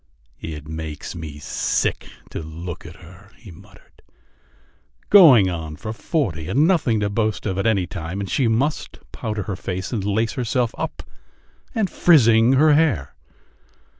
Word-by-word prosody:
"It 75 -2 -7
makes 80 -1 -6
me 80 -4 -8
sick 75 - -2 0.2
to - - -5
look 85 +2 -8
at 85 - -11
her!" 90 +3 -16
he 105 -6 -13
muttered. 80 - -19 1.1
"Going 145 - +8
on 80 -4 -5
for 110 +8 -6
forty, 105 - -2
and 145 +5 +3
nothing 145 - +2
to 100 - 0
boast 110 0 -1
of 95 -2 -2
at 100 - 0
any 100 -5 +2
time, 85 +2 -6
and 100 - -4
she 125 +5 +1
must 130 +7 -1
powder 110 -3 -4
her 100 - -4
face 95 0 -5
and 105 -5 -2
lace 105 +3 0
herself 125 -1 -1
up! - - -5 0.7
And 220 -3 +1
frizzing 120 -10 +4
her 150 +3 +5
hair! 145 - +1
100 Hz, 155 wpm, -21 LUFS, 85-125 Hz, 1.1 s, Going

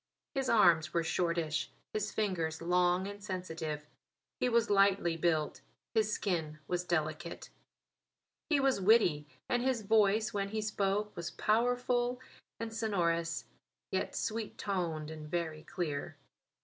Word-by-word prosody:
His 270 -2 -1
arms 170 -8 +5
were 170 - +3
shortish; 165 -2 0 0.2
his 215 -1 -1
fingers 170 -7 -1
long 180 +2 +2
and 205 0 -8
sensitive. 165 -6 -4 0.5
He 250 - +2
was 235 -2 +2
lightly 195 -4 +4
built; 160 -2 0 0.3
his 215 -2 +2
skin 165 -8 -1
was 180 0 -1
delicate. 170 -1 -2 1.0
He 300 -3 +4
was 270 -6 +2
witty, 180 -8 +4 0.2
and 245 - +1
his 255 -3 0
voice 215 0 +3
when 200 -1 -1
he 215 +1 -2
spoke 210 0 0
was 170 0 -4
powerful 245 +2 +1 0.4
and 230 -1 -4
sonorous, 170 -7 0 0.5
yet - - -1
sweet 220 -1 -3
toned 165 -6 -2
and 155 -1 -8
very 160 -2 -2
clear. 155 -2 -4
185 Hz, 130 wpm, -33 LUFS, 165-215 Hz, 1.0 s, arms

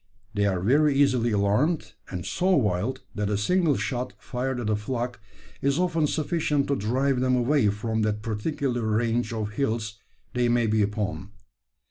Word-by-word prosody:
They 100 -1 +2
are 95 -2 0
very 140 +8 +3
easily 130 -4 +3
alarmed, 105 +5 +1 0.2
and 90 -2 -5
so 185 - 0
wild, 105 0 0
that 105 -1 -2
a 105 - +1
single 160 - +2
shot 125 -1 -3
fired 125 0 -3
at 110 -3 -1
a - - +3
flock 120 +3 -3 0.4
is 140 +1 +1
often 165 -4 +1
sufficient 150 -2 0
to 140 - +2
drive 130 +4 +1
them 130 0 +2
away 125 -1 +3
from 110 +2 -2
that 105 -1 -1
particular 120 +3 -2
range 115 +2 0
of 110 -2 -3
hills 110 -3 -2 0.3
they 125 -1 +1
may 120 -1 +3
be 110 0 +2
upon. 105 -1 -2
120 Hz, 165 wpm, -26 LUFS, 105-140 Hz, 0.4 s, very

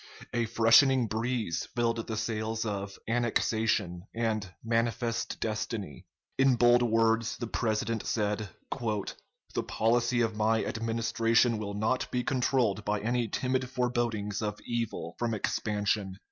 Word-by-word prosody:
A 120 -1 +1
freshening 115 +3 +5
breeze 110 -4 -2
filled 115 -1 0
the 110 - -3
sails 110 0 -2
of 100 -2 -4
"annexation" 110 -5 0
and 110 -4 -1
"manifest 115 0 -1
destiny." 105 - -4 0.3
In 135 -1 +5
bold 120 +1 +5
words 115 -1 +2
the 120 - -3
President 110 0 -1
said: 105 -1 -1 0.2
"The 110 -5 -4
policy 120 +2 +2
of 115 -2 0
my 110 +1 +2
Administration 115 0 +1
will 100 -1 -4
not 110 +5 0
be 125 0 -1
controlled 125 -6 +1
by 105 0 0
any 120 +2 0
timid 130 +3 -1
forebodings 120 -5 -1
of 105 -1 -3
evil 115 -2 -3
from 115 -2 0
expansion. 105 -2 -1
115 Hz, 125 wpm, -29 LUFS, 105-120 Hz, 0.3 s, freshening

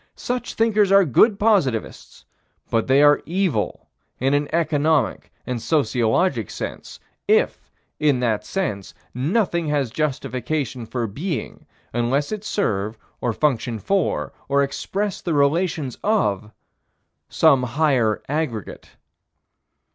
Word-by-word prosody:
Such 250 0 -4
thinkers 215 -3 +3
are 195 -1 +6
good 200 - +4
positivists, 190 - 0 0.5
but 115 -1 +1
they 135 +2 +5
are 145 -1 +5
evil 170 - -1 0.3
in 135 +2 +1
an 145 0 +1
economic 155 -4 +1
and 125 -2 -3
sociologic 120 - +1
sense, - - -7 0.3
if, - - +1 0.3
in 145 -4 +2
that 110 -4 0
sense, 105 - -3 0.2
nothing 170 - 0
has 145 -5 0
justification 130 -2 -2
for 120 0 -2
being, 140 - -5 0.3
unless 125 - 0
it 210 -1 -4
serve, 110 - -1 0.2
or 120 - 0
function 120 -2 0
for, 195 - -1 0.2
or 140 0 +3
express 195 +8 -3
the 170 -4 -1
relations 145 -2 +1
of, 110 - +1 0.8
some 145 -5 +4
higher 125 -4 +1
aggregate. 140 - -4
145 Hz, 115 wpm, -22 LUFS, 120-170 Hz, 0.8 s, are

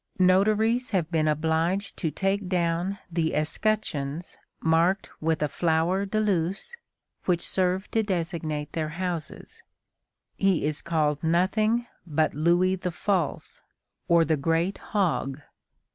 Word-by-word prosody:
Notaries 215 +6 +3
have 175 -5 -1
been 155 -2 +2
obliged 160 +6 0
to 165 - -1
take 195 +5 -1
down 175 +2 0
the 165 -1 0
escutcheons 155 -2 -1 0.2
marked 170 +4 +2
with 160 -1 +1
a - - +2
flower 170 +5 +1
de 215 +3 0
luce 195 - -1 0.5
which 175 -2 +1
served 185 +1 0
to 225 - +2
designate 165 -6 -3
their 155 -2 -2
houses. 175 -4 -5 0.8
He 195 -6 +2
is 150 -1 -1
called 155 -3 0
nothing 215 +8 +2 0.2
but 155 0 +1
Louis 175 +4 +2
the 180 - -3
False, 175 -3 -2 0.5
or 170 -1 +5
the 160 0 +1
great 165 +6 0
hog. 170 -9 -1
175 Hz, 125 wpm, -26 LUFS, 160-195 Hz, 0.8 s, or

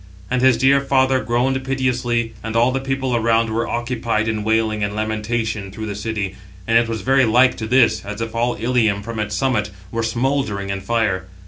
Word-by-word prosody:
And 125 0 +1
his 130 -2 +5
dear 135 +3 +4
father 130 -1 +2
groaned 130 +3 0
piteously, 125 -3 -1
and 115 0 -4
all 120 +2 +4
the 135 - -1
people 135 -1 -2
around 115 -1 +2
were 115 +1 -1
occupied 120 -2 -1
in 110 -1 -1
wailing 110 -1 +1
and 100 0 -2
lamentation 110 -1 -2
through 110 +3 -6
the 105 - -4
city; 100 -1 -3 0.3
and 115 - +1
it 115 0 +4
was 115 -2 -3
very 135 +5 +3
like 125 +3 +4
to 110 - -4
this, 125 +1 +3
as 105 +1 -6
if 115 -1 -4
all 120 +1 0
Ilium, 115 -4 +1
from 115 0 -5
its 105 -1 -2
summit, 105 -3 0 0.2
were 115 - -1
smouldering 115 -4 -1
in 100 0 -3
fire. 95 -3 -1
115 Hz, 200 wpm, -20 LUFS, 110-125 Hz, 0.3 s, his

